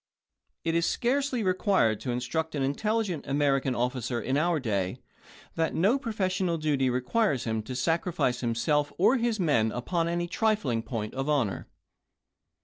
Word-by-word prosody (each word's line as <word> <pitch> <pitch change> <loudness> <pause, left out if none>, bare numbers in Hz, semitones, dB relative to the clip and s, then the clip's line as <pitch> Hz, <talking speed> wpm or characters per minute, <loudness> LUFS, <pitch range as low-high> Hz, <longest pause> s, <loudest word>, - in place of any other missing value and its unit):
\t - - -56
p'. - - -1
^L - - +1
It - - +3
is 170 - 0
scarcely 260 -1 0
required 185 - +2
to 130 - -5
instruct 140 +7 -2
an 140 - 0
intelligent 190 +3 -1
American 135 -2 +1
officer 125 0 -1
in 130 +3 -1
our 165 +2 +2
day, 100 -7 -1 0.6
that 165 0 -1
no 205 +11 +3
professional 185 -7 -1
duty 145 -4 +1
requires 130 - +1
him 110 -1 -1
to 125 +4 -7
sacrifice 165 -2 0
himself 145 +5 +1
or 215 +9 +4
his 235 -2 0
men 120 -11 +2
upon 165 +9 -1
any 175 0 -1
trifling 185 - 0
point 110 -2 -4
of 135 +2 -3
honor. 125 - 0
150 Hz, 160 wpm, -28 LUFS, 125-185 Hz, 0.6 s, or